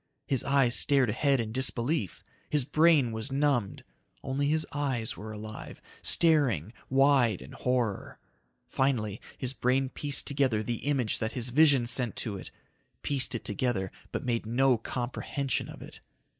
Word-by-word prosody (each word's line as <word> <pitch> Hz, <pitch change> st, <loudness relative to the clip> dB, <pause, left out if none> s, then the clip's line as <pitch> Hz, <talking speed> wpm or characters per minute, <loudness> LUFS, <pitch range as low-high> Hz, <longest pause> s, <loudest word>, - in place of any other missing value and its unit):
His 135 Hz, -3 st, +1 dB
eyes 135 Hz, -3 st, +3 dB
stared 135 Hz, -6 st, +3 dB
ahead 135 Hz, +3 st, +2 dB
in 110 Hz, -2 st, -3 dB
disbelief. 125 Hz, -, -1 dB, 0.3 s
His 150 Hz, -4 st, +1 dB
brain 155 Hz, -4 st, +4 dB
was 110 Hz, +4 st, -4 dB
numbed. 135 Hz, -7 st, 0 dB, 0.4 s
Only 140 Hz, +1 st, -1 dB
his 155 Hz, +1 st, +1 dB
eyes 135 Hz, -6 st, -2 dB
were 110 Hz, +4 st, -8 dB
alive, 110 Hz, 0 st, -8 dB, 0.2 s
staring, 130 Hz, -, +2 dB, 0.2 s
wide 135 Hz, -6 st, +4 dB
in 65 Hz, -, -11 dB
horror. 125 Hz, -5 st, -2 dB, 0.5 s
Finally 115 Hz, -7 st, -1 dB, 0.2 s
his 130 Hz, -1 st, -3 dB
brain 130 Hz, +1 st, +1 dB
pieced 145 Hz, +1 st, -3 dB
together 135 Hz, -7 st, +1 dB
the 120 Hz, +2 st, -4 dB
image 130 Hz, -7 st, 0 dB
that 110 Hz, 0 st, -2 dB
his 125 Hz, -1 st, -1 dB
vision 140 Hz, -2 st, +4 dB
sent 120 Hz, -2 st, +3 dB
to 105 Hz, -3 st, -4 dB
it. 95 Hz, -, -8 dB, 0.5 s
Pieced 135 Hz, -3 st, 0 dB
it 115 Hz, -, -5 dB
together 105 Hz, -3 st, -1 dB, 0.2 s
but -, -, -4 dB
made 115 Hz, -3 st, -1 dB
no 130 Hz, +2 st, +3 dB
comprehension 130 Hz, +3 st, -3 dB
of -, -, -10 dB
it. -, -, -12 dB
125 Hz, 150 wpm, -29 LUFS, 115-140 Hz, 0.5 s, brain